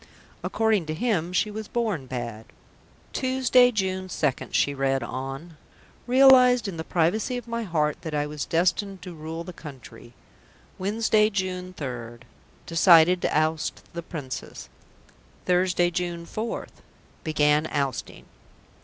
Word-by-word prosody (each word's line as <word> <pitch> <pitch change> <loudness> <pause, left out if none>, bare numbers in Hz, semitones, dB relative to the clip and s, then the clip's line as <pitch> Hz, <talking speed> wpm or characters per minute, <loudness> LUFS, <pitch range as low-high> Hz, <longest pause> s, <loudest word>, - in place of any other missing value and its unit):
According 220 -7 +1
to 155 - -3
him 180 -4 0
she 210 +3 +1
was 215 0 -6
born 215 - -2
bad. 120 -3 -5 0.7
"Tuesday, 255 -1 +4
June 190 -4 -2
2nd," 150 -7 -1
she 145 - +2
read 135 -1 0
on. 135 +7 -6 0.5
"Realised 250 -2 +6
in 185 -4 -5
the 160 - -4
privacy 185 +10 0
of 240 -1 -8
my 230 0 -3
heart 155 -7 -1
that 160 -3 -5
I 145 0 0
was 150 -1 -5
destined 185 +3 0
to 180 -2 -8
rule 160 +1 -6
the 180 - -9
country. 125 -7 -12 0.7
Wednesday, 215 +2 +2
June 185 -2 -3
3rd. 120 -4 -6 0.4
Decided 170 +1 +5
to - - +1
oust 155 0 -1
the 170 - -4
Princess. 150 -6 -7 0.8
Thursday, 180 -1 +2
June 175 -1 -3
4th. 220 +6 -5 0.4
Began 150 -1 +2
ousting." 140 -4 -3
170 Hz, 130 wpm, -25 LUFS, 150-210 Hz, 0.8 s, Realised